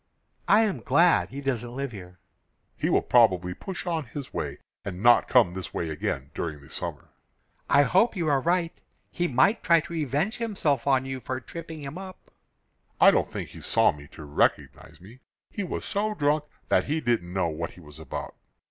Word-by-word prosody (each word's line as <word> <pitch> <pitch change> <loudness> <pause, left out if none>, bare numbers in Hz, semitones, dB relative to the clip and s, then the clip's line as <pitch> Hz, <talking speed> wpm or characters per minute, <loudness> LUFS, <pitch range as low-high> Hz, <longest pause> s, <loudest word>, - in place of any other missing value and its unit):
"I 210 - +6
am 200 - -1
glad 165 +9 +3
he 140 +2 -7
doesn't 120 -3 -3
live 135 -1 -3
here." 90 -4 -11 0.6
"He - - -1
will - - +3
probably 95 -7 +3
push 185 - -7
on 165 -4 -1
his 145 -3 -8
way - - -3 0.3
and 95 0 -6
not 120 0 +6
come 115 -9 +4
this 95 0 -7
way 85 - -2
again 70 -2 -3
during 80 -3 -4
the 70 - -17
summer." - - -6 0.6
"I 140 0 +6
hope 195 +10 +3
you 170 -4 -1
are 140 -3 +2
right. 170 +2 +1 0.4
He 175 - -1
might 135 - +3
try 170 0 +5
to 170 - -9
revenge 155 - -1
himself 165 - -1
on 135 -1 +3
you 135 0 -4
for 130 +2 -4
tripping 160 +1 -8
him 140 +6 -6
up." 190 -1 -11 0.7
"I - - +8
don't - - 0
think - - -5
he - - -12
saw - - +3
me 75 0 -12
to 80 - -10
recognize 75 0 -1
me. 110 +8 -15 0.3
He 205 - -3
was 180 - -4
so 210 +1 -1
drunk 150 -1 +1 0.2
that - - +3
he 155 +3 -1
didn't 115 - -1
know 90 -2 0
what 80 +1 -5
he - - -15
was 75 -3 -13
about. 80 - -6
135 Hz, 195 wpm, -26 LUFS, -, 0.7 s, I